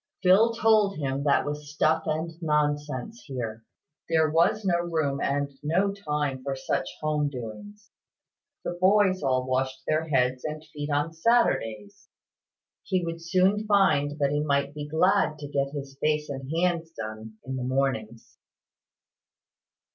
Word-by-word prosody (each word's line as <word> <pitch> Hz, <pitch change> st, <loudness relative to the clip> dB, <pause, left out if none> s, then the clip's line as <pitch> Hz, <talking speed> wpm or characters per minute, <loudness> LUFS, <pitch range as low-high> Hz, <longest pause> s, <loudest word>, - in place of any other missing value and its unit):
Phil 195 Hz, +5 st, +6 dB
told 215 Hz, -3 st, +3 dB
him 140 Hz, -1 st, -2 dB
that 140 Hz, -, +3 dB
was 145 Hz, 0 st, -5 dB
stuff 155 Hz, +1 st, +1 dB
and 160 Hz, +2 st, -1 dB
nonsense 150 Hz, -, -1 dB
here. 115 Hz, -4 st, -5 dB, 0.5 s
There 160 Hz, -2 st, +3 dB
was 175 Hz, +6 st, +2 dB
no 175 Hz, -2 st, +2 dB
room 160 Hz, -5 st, -1 dB
and 140 Hz, 0 st, 0 dB
no 180 Hz, +7 st, +1 dB
time 150 Hz, -8 st, -2 dB
for 135 Hz, 0 st, -2 dB
such 130 Hz, -, -2 dB
home 150 Hz, -1 st, 0 dB
doings. 200 Hz, -, -9 dB, 0.7 s
The -, -, -2 dB
boys 190 Hz, -1 st, +4 dB
all 130 Hz, -2 st, +1 dB
washed 130 Hz, +1 st, -1 dB
their 155 Hz, +1 st, 0 dB
heads 125 Hz, -3 st, +1 dB
and 155 Hz, 0 st, -5 dB
feet 145 Hz, 0 st, -4 dB
on 145 Hz, +2 st, 0 dB
Saturdays. 160 Hz, -, 0 dB, 0.7 s
He 185 Hz, -2 st, -1 dB
would 165 Hz, 0 st, -5 dB
soon 190 Hz, +5 st, +2 dB
find 170 Hz, -8 st, +3 dB
that 140 Hz, -2 st, +1 dB
he 145 Hz, -, +1 dB
might 140 Hz, -1 st, 0 dB
be 145 Hz, 0 st, -6 dB
glad 160 Hz, +1 st, +2 dB
to 145 Hz, -1 st, -7 dB
get 140 Hz, -1 st, -1 dB
his 140 Hz, -1 st, -7 dB
face 150 Hz, 0 st, 0 dB
and 135 Hz, -1 st, -6 dB
hands 170 Hz, 0 st, 0 dB
done 110 Hz, -2 st, -7 dB
in 130 Hz, +1 st, -4 dB
the 130 Hz, -, -3 dB
mornings. 125 Hz, -4 st, -2 dB
150 Hz, 145 wpm, -27 LUFS, 135-170 Hz, 0.7 s, Phil